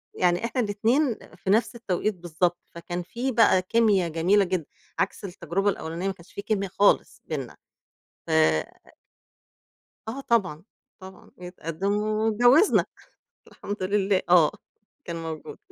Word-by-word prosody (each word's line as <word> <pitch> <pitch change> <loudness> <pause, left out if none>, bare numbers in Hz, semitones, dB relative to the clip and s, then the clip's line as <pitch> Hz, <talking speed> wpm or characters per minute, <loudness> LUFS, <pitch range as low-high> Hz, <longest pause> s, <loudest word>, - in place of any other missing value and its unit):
يعني 180 +4 +1
إحنا 250 +2 -1
الإتنين 230 +5 +1 0.2
في 185 - -6
نفس 225 +4 +2
التوقيت 215 -2 -1
بالضبط، 175 0 -1 0.2
فكان 175 +1 -5
في 240 +9 -3
بقى 225 -6 +4
كيميا 200 -2 +2
جميلة 170 +6 +3
جدًا 180 -3 -2 0.3
عكْس - - -1
التجربة 190 +1 -1
الأوّلانية، 170 -1 -3
ما 195 - -1
كانش 175 -3 -19
في - - -5
كيميا 200 -1 -1
خالص 200 +2 +2
بيننا. 135 -6 -4 0.7
ف - - -8 1.8
آه 250 +5 -5
طبعًا، 190 - 0 0.4
طبعًا. 190 0 -13
جِه 180 - -8
اتقدِّم 180 +2 -3
واتجوّزنا 220 - +3 0.6
الحمد 205 -1 -6
لله، 195 0 +1
آه 175 -4 +6 0.5
كان 170 - -5
موجود. 160 -1 -7
195 Hz, 130 wpm, -25 LUFS, 175-215 Hz, 1.8 s, آه